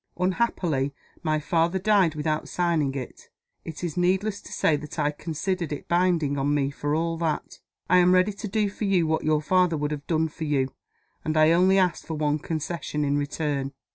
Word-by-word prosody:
Unhappily, 175 - 0 0.3
my 155 -2 0
father 165 +4 +1
died 190 -4 +3
without 155 0 -2
signing 165 -6 0
it. 130 -3 -7 0.3
It 160 +1 -8
is 170 -4 -3
needless 190 +3 +1
to - - -12
say 155 - +2
that 150 0 -9
I 145 - +1
consider 170 +4 -3
it 145 -2 -6
binding 170 -5 +1
on 145 +2 +1
me 140 -1 0
for 145 +1 -2
all 165 +1 -1
that. 165 -2 -2 0.3
I 180 +1 +5
am 180 0 +5
ready 185 +3 +3
to 210 +2 -6
do 210 +1 +1
for 205 +2 -4
you 185 -4 +3
what 160 0 0
your 155 0 +1
father 180 -1 +3
would 150 0 -2
have 145 -1 -5
done 160 -1 +1
for 160 +1 -6
you. 135 -3 0 0.5
And 155 0 -1
I 155 +1 +6
only 185 +3 +4
ask 180 -3 +1
for 160 - -5
one 150 0 0
concession 155 -1 -3
in 145 0 +1
return." 145 -1 -2
160 Hz, 200 wpm, -25 LUFS, 150-180 Hz, 0.5 s, I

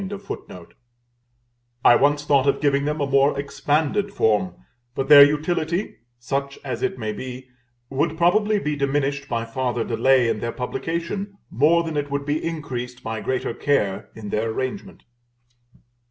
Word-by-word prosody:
"[A] 195 - -7 1.2
I 120 - +8
once 145 +1 +2
thought 140 -2 +3
of 140 - +2
giving 140 -1 +1
them 150 +1 -1
a - - +2
more 140 +1 +2
expanded 155 +7 0
form; 105 - +1 0.4
but 135 +1 -2
their 145 -1 +11
utility, 160 +5 0 0.2
such 140 +3 -3
as 130 -4 -4
it 195 0 -1
may 110 -2 -3
be, 130 +3 -8 0.4
would 145 +4 0
probably 205 +5 +3
be 150 -6 -2
diminished 140 0 -1
by 115 -1 -1
farther 120 0 -2
delay 125 +2 +3
in 115 - -1
their 115 - -3
publication, 170 +9 -4
more 160 +7 +3
than 160 -2 -4
it 145 0 -2
would 140 0 -3
be 150 +1 -1
increased 125 -7 -5
by 110 -1 -4
greater 130 -2 -2
care 105 -9 0
in 105 -2 -8
their 110 +2 -1
arrangement. 130 - -5
140 Hz, 155 wpm, -23 LUFS, 125-155 Hz, 1.2 s, their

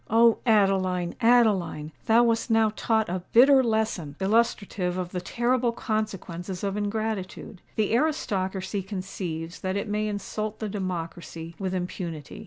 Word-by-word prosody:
O 230 +1 +5
Adeline, 190 -5 +2
Adeline! 205 -10 +3 0.2
thou 230 +2 +6
wast 230 0 +1
now 225 -1 +4
taught 220 -1 +1
a 180 +1 -3
bitter 265 +3 +7
lesson 220 - -1
illustrative 200 -3 +1
of 180 -1 -3
the 180 - -3
terrible 240 +4 +1
consequences 195 -6 -4
of 200 -1 -1
ingratitude! 210 -2 -3
The 215 0 +1
aristocracy 200 -9 0
conceives 180 -3 -5
that 190 +1 -2
it 200 - -3
may 210 +1 -1
insult 210 +1 -4
the 215 - -4
democracy 170 -4 -5
with 190 -1 -2
impunity. 175 -4 -5
200 Hz, 135 wpm, -26 LUFS, 180-225 Hz, 0.2 s, bitter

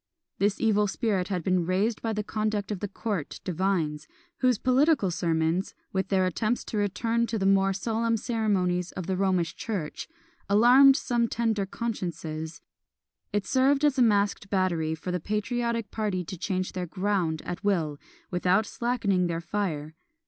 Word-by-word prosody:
This 200 +1 +1
evil 210 -2 +3
spirit 195 -3 -1
had 185 -4 -2
been 185 0 +2
raised 205 +5 0
by 225 - -1
the 210 -1 -2
conduct 215 -1 -2
of 205 - -3
the 205 - -3
court 195 -5 -4
divines, 170 -4 -1 0.3
whose 255 -3 +3
political 260 - +3
sermons, 165 +1 0 0.2
with 190 -1 0
their 190 -1 +2
attempts 215 +7 -1
to 215 - -5
return 230 +3 0
to 225 - -2
the 195 - -1
more 195 0 +4
solemn 225 +3 0
ceremonies 190 -6 0
of 185 - -5
the 190 - -1
Romish 185 -3 +1
church, 195 -9 -4 0.4
alarmed 250 +6 +7
some 240 -3 +1
tender 220 -4 0
consciences; 170 -8 -4 0.7
it 205 -1 -1
served 275 +2 +3
as 285 -2 +2
a - - +5
masked 205 -3 +2
battery 170 -5 0
for 160 +3 -5
the 180 - -1
patriotic 230 +3 -2
party 205 -5 -1
to 190 - -6
change 185 +1 -2
their 180 -1 -4
ground 185 -4 -1
at 175 - -5
will, 165 -8 0 0.3
without 185 +3 +2
slackening 205 -7 0
their 165 -1 -2
fire. 170 -4 -3
195 Hz, 160 wpm, -27 LUFS, 180-225 Hz, 0.7 s, alarmed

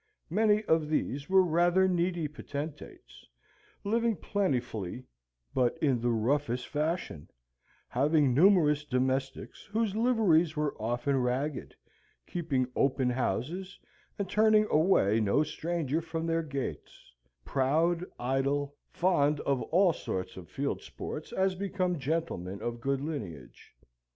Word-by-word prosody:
Many 215 +2 +3
of 160 -6 +1
these 145 -1 -2
were 190 0 +6
rather 175 +2 +3
needy 175 -2 0
potentates, 150 0 -8 0.6
living 230 +2 +1
plentifully 125 - -2 0.5
but 125 +3 +1
in 135 -7 +1
the 120 - +1
roughest 125 +2 0
fashion, 155 - -3 0.6
having 145 +1 +2
numerous 150 -2 +4
domestics 130 0 -2
whose 215 -1 -1
liveries 210 -9 +3
were 150 -1 -1
often 120 +5 0
ragged; 130 +4 -2 0.5
keeping 155 -7 -1
open 130 -2 +2
houses, 150 - -2 0.4
and 200 - -2
turning 215 +1 +4
away 150 - +3
no 110 +8 +2
stranger 160 -1 -2
from 165 0 -4
their 165 0 +1
gates; 140 - -6 0.3
proud, 160 +6 +1 0.2
idle, 140 +3 0 0.2
fond 150 -5 +2
of 135 -3 0
all 180 +1 +3
sorts 95 -9 -4
of 90 -3 -10
field 140 +1 -3
sports 155 - -7
as 190 0 +1
became 185 -2 -2
gentlemen 135 - -3
of 120 0 -4
good 135 +1 0
lineage. 100 - -7
150 Hz, 120 wpm, -30 LUFS, 130-175 Hz, 0.6 s, were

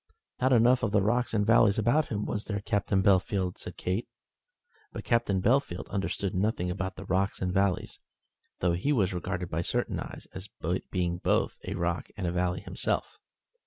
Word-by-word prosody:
"Not 130 +1 +3
enough 125 +1 +5
of 110 - +1
the 105 - +3
rocks 120 +4 +1
and 105 -2 +1
valleys 110 -2 +5
about 120 +8 +2
him, 105 -1 -2
was 105 - -3
there, 100 -2 -2
Captain 100 -2 +1
Bellfield?" 95 -1 +2
said - - -7
Kate. 95 +6 -2 0.8
But - - -6
Captain 110 -6 +1
Bellfield 120 -6 +1
understood 100 0 -2
nothing 95 -2 0
about 95 0 -3
the 100 - -8
rocks 95 +2 0
and 90 -1 -1
valleys, 95 -1 0 0.6
though 90 -1 +3
he 90 +12 0
was 100 -9 +2
regarded 90 0 -3
by 80 - 0
certain - - -1
eyes - - -7
as 95 +1 -7 0.4
being 85 -2 -1
both - - +1
a 95 - -2
rock 85 -2 -1
and 100 - -3
a 85 - 0
valley 90 0 0
himself. - - -2
100 Hz, 180 wpm, -29 LUFS, 90-110 Hz, 0.8 s, enough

